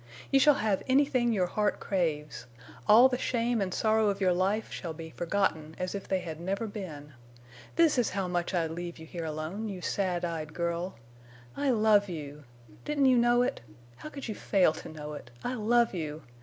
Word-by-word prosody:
You 275 - +5
shall 295 +1 +6
have 215 -7 0
anything 260 -3 +3
your 190 -5 +2
heart 210 +3 0
craves. 150 -10 -2 0.4
All 225 +5 +8
the 250 -1 -2
shame 235 -2 0
and 190 -1 -1
sorrow 220 +2 +2
of 200 - -2
your 185 -2 +3
life 195 +5 0
shall 170 -3 -5
be 160 0 -8
forgotten—as 175 -1 -1
if 200 -1 -5
they 190 -1 0
had 160 -3 -6
never 195 +5 -2
been. 160 -9 -7 0.6
This 325 -6 +4
is 240 - +2
how 195 -1 -2
much 175 -1 -1
I'd 165 -3 0
leave 175 +1 -6
you 160 - -10
here 165 +1 -6
alone—you 180 +6 -4
sad 180 -3 -1
eyed 155 -2 -5
girl. 170 +1 -2 0.6
I 285 -1 0
love 215 -4 +4
you! 150 -3 -7 0.4
Didn't 290 -2 +1
you 255 -1 +5
know 240 +1 +4
it? 250 - -2 0.4
How - - -8
could 280 -4 -7
you 220 - -3
fail 190 -6 +2
to - - -9
know 150 -1 -7
it? 135 -4 -9
I 245 - -2
love 235 0 +2
you! 155 -3 -4
190 Hz, 190 wpm, -29 LUFS, 165-225 Hz, 0.6 s, All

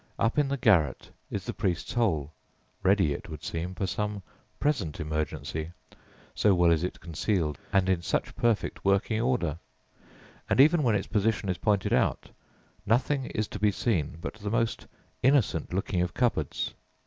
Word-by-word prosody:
Up 115 +6 +1
in 145 - +3
the 140 +1 -1
garret 90 - +2 0.2
is - - -4
the - - -3
"priest's 90 -3 -2
hole," 85 - +1 0.5
ready, 95 -6 +3
it - - -8
would 75 0 -8
seem, 85 +3 -4
for 95 - -1
some 105 +1 -3 0.4
present 110 - 0
emergency, 75 +1 -3 0.6
so 105 -3 +3
well 85 -1 +4
is 80 0 +2
it 90 - -3
concealed 85 - -1
and 95 -1 +3
in 95 -2 +2
such 85 - -2
perfect 115 -3 0
working 100 +3 +2
order; 100 - 0 0.9
and - - +2
even 155 +4 +6
when 120 -6 +2
its 100 - -1
position 105 -2 0
is 90 -1 -1
pointed 100 0 +1
out, - - +1 0.5
nothing 130 +6 +1
is 110 -2 -2
to - - -6
be 105 - +4
seen 90 - -1
but - - -5
the 105 -2 -6
most 115 +1 -1 0.3
innocent 125 - +2
looking 90 -1 -1
of 90 0 -2
cupboards. 120 -2 0
95 Hz, 165 wpm, -28 LUFS, 85-115 Hz, 0.9 s, even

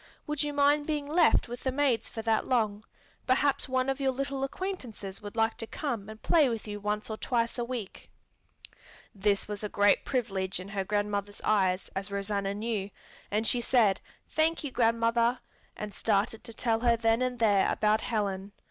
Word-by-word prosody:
Would 300 -2 -2
you 295 -1 -1
mind 290 +1 +3
being 300 -2 -1
left 320 +3 +4
with 245 +1 -7
the 260 - 0
maids 265 -3 +1
for 225 - -6
that 225 -1 +1
long? 215 -4 +1 0.4
Perhaps 270 +1 +2
one 255 0 +1
of 270 +1 -1
your 270 -1 +2
little 275 +1 -3
acquaintances 260 - -5
would 205 0 -8
like 225 0 +1
to 225 - -5
come 230 -9 -4
and 220 0 -9
play 305 -1 +4
with 225 -2 -4
you 205 0 -5
once 210 +1 -2
or 215 - -3
twice 235 0 -1
a - - +1
week." 235 -5 -6 1.0
This 200 0 +1
was 210 0 -5
a 210 - -2
great 205 0 +3
privilege 195 -8 -1
in 185 +2 -8
her 200 -1 -2
grandmother's 205 0 -2
eyes, 190 -3 +2
as 195 +1 -3
Rosanna 200 0 -2
knew, 210 -2 -2 0.4
and 215 +2 0
she 240 +1 +3
said, 225 -6 +3 0.3
"Thank 320 +1 +1
you, 290 - -4
grandmother," 230 +1 +2 0.4
and 210 -1 -5
started 215 +1 0
to 230 - -7
tell 225 -2 +1
her 235 0 +3
then 225 +1 +2
and 255 -1 0
there 205 -4 +3
about 215 +1 +2
Helen. 200 -3 -2
225 Hz, 185 wpm, -29 LUFS, 205-255 Hz, 1.0 s, left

